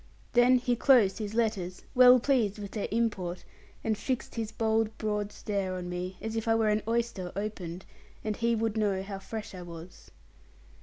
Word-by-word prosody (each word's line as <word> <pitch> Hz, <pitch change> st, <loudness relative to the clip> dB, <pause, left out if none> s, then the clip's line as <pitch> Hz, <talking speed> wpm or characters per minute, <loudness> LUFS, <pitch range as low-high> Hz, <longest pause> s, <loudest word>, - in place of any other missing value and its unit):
Then 245 Hz, +1 st, +6 dB
he 245 Hz, 0 st, 0 dB
closed 235 Hz, -6 st, +4 dB
his 215 Hz, 0 st, -4 dB
letters, 205 Hz, -6 st, -1 dB
well 250 Hz, 0 st, +8 dB
pleased 235 Hz, -6 st, +1 dB
with 200 Hz, -2 st, -7 dB
their 210 Hz, -, -3 dB
import, 205 Hz, -6 st, -1 dB, 0.4 s
and 220 Hz, -1 st, +1 dB
fixed 250 Hz, +4 st, -3 dB
his 225 Hz, -2 st, -3 dB
bold 220 Hz, -1 st, 0 dB
broad 210 Hz, -1 st, -2 dB
stare 200 Hz, -4 st, -2 dB
on 180 Hz, -1 st, -5 dB
me, 180 Hz, +1 st, -4 dB
as 220 Hz, 0 st, -4 dB
if 225 Hz, 0 st, -2 dB
I 225 Hz, -, +4 dB
were 220 Hz, -1 st, +2 dB
an 210 Hz, 0 st, +2 dB
oyster 230 Hz, -6 st, -1 dB
opened, 190 Hz, -4 st, -5 dB, 0.4 s
and 215 Hz, -1 st, -1 dB
he 235 Hz, +1 st, +1 dB
would 225 Hz, -1 st, -1 dB
know 200 Hz, -3 st, +1 dB
how 195 Hz, 0 st, -6 dB
fresh 215 Hz, +2 st, -7 dB
I 185 Hz, -, -7 dB
was. 170 Hz, 0 st, -11 dB
215 Hz, 185 wpm, -29 LUFS, 190-230 Hz, 0.4 s, well